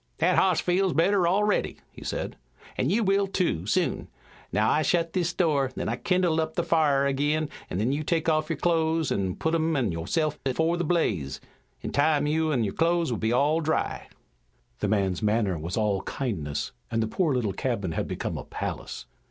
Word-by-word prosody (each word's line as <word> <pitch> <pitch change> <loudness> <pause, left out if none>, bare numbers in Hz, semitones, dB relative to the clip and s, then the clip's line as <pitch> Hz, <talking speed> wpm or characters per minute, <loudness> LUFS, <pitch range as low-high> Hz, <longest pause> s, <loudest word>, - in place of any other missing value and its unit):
"That - - +3
hoss 185 -3 +3
feels 185 +1 +1
better 175 +3 +3
already," 205 +3 +1
he - - -12
said, - - -3 0.4
"an' 130 - 0
you 220 +6 +2
will, 195 0 +2
too, 175 - -1
soon. - - 0 0.4
Now, 105 +4 +2
I 155 - +3
shet 165 0 +1
this 175 -2 0
door, 150 -7 +1
then - - -3
I 115 - 0
kindle 175 +1 +1
up 160 0 -4
the 170 - +1
fire 145 -5 +3
ag'in, 145 +3 0 0.2
then 105 +8 0
you 145 +2 -1
take 165 +1 -1
off 155 -1 +1
your 165 - -1
clothes 160 -2 +1
an' 95 -2 -1
put 160 - -1
them 165 0 +1
an' 120 -8 +1
yo'self 150 - -1
afore 160 +6 +1
the 175 - -1
blaze. 100 - 0 0.4
In - - -4
time 145 +1 +2
you 155 +1 +1
an' 125 -6 +1
your 100 - -2
clothes 170 -2 +1
are 110 -1 0
all 150 +5 +2
dry." 160 0 -1 0.7
The 105 - 0
man's 95 -3 0
manner 105 -3 +1
was 85 +3 -4
all 105 -3 +1
kindness, 85 - -3 0.2
and 115 -1 0
the - - -1
poor 155 - 0
little 110 -6 0
cabin 100 -8 -2
had - - -2
become - - -4
a - - -6
palace. - - -5
155 Hz, 195 wpm, -26 LUFS, 110-165 Hz, 0.7 s, That